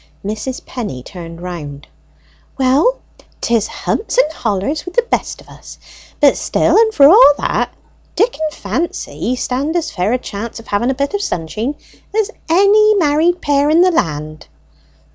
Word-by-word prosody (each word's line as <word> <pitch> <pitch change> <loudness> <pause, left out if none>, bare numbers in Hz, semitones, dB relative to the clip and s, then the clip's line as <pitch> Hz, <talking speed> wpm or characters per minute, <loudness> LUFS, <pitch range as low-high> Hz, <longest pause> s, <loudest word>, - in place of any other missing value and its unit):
Mrs. 215 +5 -5
Penny 205 - -6
turned 170 -1 -10
round. 150 -6 -7 0.7
"Well, 275 - +2 0.4
'tis 230 -3 0
humps 450 - -3
and 410 -11 +3
hollers 225 +7 -2
with 360 - -9
the 485 - +3
best - - -2
of - - -17
us; - - -13 0.4
but - - +5
still - - +1
and 445 0 +5
for 280 -10 +6
all 380 -1 +8
that, - - -1 0.5
Dick 450 +6 +1
and 310 -1 -1
Fancy 335 -6 -3
stand 270 +6 -2
as 335 -2 -1
fair 195 +2 -1
a 250 - +2
chance 230 -1 -7
of 230 - -13
having 205 +5 0
a 265 - 0
bit 280 +5 -2
of 405 - -1
sunsheen 220 - -3 0.4
as 440 0 +1 0.2
any 415 +5 +5
married 330 0 +2
pair 285 0 +2
in 320 +3 +4
the 365 0 +4
land." 155 - -3
280 Hz, 160 wpm, -16 LUFS, -, 0.7 s, all